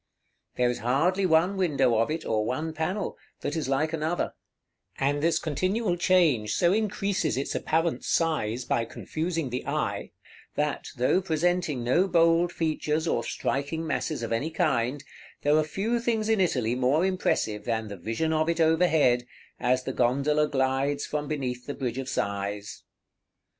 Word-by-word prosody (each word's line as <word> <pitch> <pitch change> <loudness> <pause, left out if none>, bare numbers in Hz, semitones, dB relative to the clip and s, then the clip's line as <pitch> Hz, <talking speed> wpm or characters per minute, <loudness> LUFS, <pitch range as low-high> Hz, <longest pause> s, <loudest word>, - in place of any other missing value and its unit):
There 125 -1 +2
is 125 - -5
hardly 175 +11 +2
one 175 +4 +3
window 135 -10 +2
of 115 - +1
it, 160 +1 -3
or 110 -1 +1
one 155 +8 -2
panel, 180 +6 -3 0.2
that 145 - -2
is 155 -4 -2
like 155 +4 +1
another; 160 +2 -1 0.6
and 145 +2 0
this 165 +2 +2
continual 185 - 0
change 170 -12 +3
so 175 +1 +3
increases 200 -7 0
its 135 - -2
apparent 165 +1 0
size 130 -8 0
by 115 - +1
confusing 160 +3 -3
the 125 - -3
eye, - - -2 0.5
that, 150 -1 -1
though 130 +10 +3
presenting 170 -5 0
no 170 +11 +3
bold 170 0 +3
features, 155 -1 -1
or - - +1
striking 145 +4 -2
masses 155 -3 -2
of 115 - -4
any 115 +8 0
kind, 145 -5 0 0.4
there 145 +1 +4
are 155 - +4
few 205 +10 -1
things 225 -2 0
in 220 -3 +3
Italy 125 -10 +1
more 130 +7 +2
impressive 180 - 0
than 110 -2 -1
the 100 - -6
vision 115 - -1
of 155 +1 +1
it 170 0 0
overhead, 160 -7 +3 0.3
as 125 +1 +1
the - - -3
gondola 140 +5 +2
glides 135 +1 0
from 150 -1 -3
beneath 125 -5 -3
the 145 - -4
Bridge 125 -1 -3
of 135 0 -4
Sighs. 100 -2 -3
150 Hz, 160 wpm, -27 LUFS, 125-170 Hz, 0.6 s, there